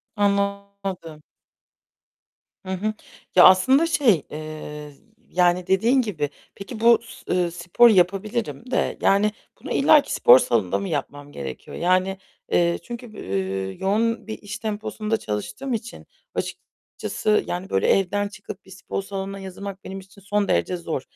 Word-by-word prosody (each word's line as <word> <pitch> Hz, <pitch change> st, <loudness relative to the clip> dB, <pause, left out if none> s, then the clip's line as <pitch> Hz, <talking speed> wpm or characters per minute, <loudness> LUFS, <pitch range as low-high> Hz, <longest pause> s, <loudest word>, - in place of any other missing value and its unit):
Anlamadım. 200 Hz, -5 st, -2 dB, 1.4 s
Hı -, -, -8 dB
hı. 215 Hz, +4 st, -1 dB, 0.4 s
Ya, 180 Hz, -, +9 dB
aslında 260 Hz, -, +6 dB
şey, 250 Hz, -, +3 dB
eee, 150 Hz, -1 st, -7 dB, 0.4 s
yani 180 Hz, 0 st, +2 dB
dediğin 230 Hz, +8 st, +3 dB
gibi. 160 Hz, -, -2 dB, 0.3 s
Peki, 215 Hz, +3 st, -8 dB
bu 235 Hz, 0 st, +6 dB
s, 225 Hz, -, -6 dB
ııı, 175 Hz, -2 st, +1 dB
sporu 175 Hz, +7 st, +4 dB
yapabilirim 215 Hz, +6 st, 0 dB
de -, -, 0 dB
yani 205 Hz, +2 st, +3 dB, 0.3 s
bunu -, -, -7 dB
illaki -, -, +4 dB
spor 485 Hz, +1 st, +7 dB
salonunda -, -, +1 dB
mı 195 Hz, -, -4 dB
yapmam 145 Hz, -1 st, -4 dB
gerekiyor? 65 Hz, -, -7 dB
Yani, 185 Hz, +2 st, +1 dB, 0.3 s
eee, 170 Hz, 0 st, +2 dB
çünkü, 240 Hz, +3 st, -7 dB
eee, 95 Hz, 0 st, -3 dB
yoğun 225 Hz, +4 st, 0 dB
bir 220 Hz, -, -5 dB
iş 205 Hz, +2 st, -7 dB
temposunda 215 Hz, 0 st, -2 dB
çalıştığım 215 Hz, -, -4 dB
için 230 Hz, +1 st, -6 dB, 0.3 s
açıkçası, 210 Hz, 0 st, -2 dB
yani 180 Hz, +2 st, -4 dB
böyle 95 Hz, -, +1 dB
evden 205 Hz, +2 st, +2 dB
çıkıp 200 Hz, -1 st, -10 dB
bir 190 Hz, -, -16 dB
spor 195 Hz, +1 st, -5 dB
salonuna 195 Hz, 0 st, -5 dB
yazılmak 195 Hz, +1 st, -8 dB
benim 195 Hz, 0 st, -7 dB
için 190 Hz, +1 st, -16 dB
son 205 Hz, +1 st, 0 dB
derece 180 Hz, -, +1 dB
zor. 165 Hz, -5 st, -3 dB
195 Hz, 140 wpm, -23 LUFS, 175-215 Hz, 1.4 s, Ya